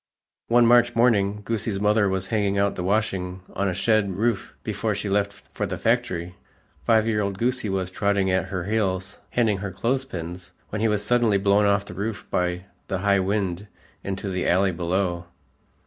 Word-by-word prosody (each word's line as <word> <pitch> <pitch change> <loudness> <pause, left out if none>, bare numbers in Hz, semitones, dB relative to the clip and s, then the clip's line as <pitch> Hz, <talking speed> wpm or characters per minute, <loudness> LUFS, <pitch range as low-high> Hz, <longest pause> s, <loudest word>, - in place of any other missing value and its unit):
One 120 0 +5
March 120 0 +5
morning, 105 -4 +2
Goosie's 110 -2 -1
mother 105 0 +3
was 95 -1 -1
hanging 100 -2 +1
out 100 0 +2
the 90 - -4
washing 95 -2 -1
on 100 +1 0
a - - -1
shed 110 0 +2
roof 100 +2 -1
before - - -1
she 100 - -3
left 100 0 +1 0.2
for - - -2
the - - -4
factory. 100 -7 0 0.5
Five 110 -1 +4
year 105 -2 +1
old 100 -1 -2
Goosie 120 -1 0
was 95 -1 -2
trotting 100 -1 +1
at 95 - +1
her 95 -2 -3
heels 95 -2 -1
handing 110 -5 +1
her 100 +1 -4
clothes 120 +8 -1
pins, 90 -4 -7 0.2
when 105 - -3
he 115 - +3
was 105 -1 0
suddenly 120 -3 +3
blown 100 +1 +3
off 100 0 +2
the 90 - -9
roof 100 +4 -4
by 90 0 -1 0.2
the 95 - -1
high 100 -1 +4
wind 95 0 -1 0.4
into 95 0 -4
the 90 -1 -1
alley 95 +2 +3
below. 85 0 -1
100 Hz, 185 wpm, -24 LUFS, 95-110 Hz, 0.5 s, One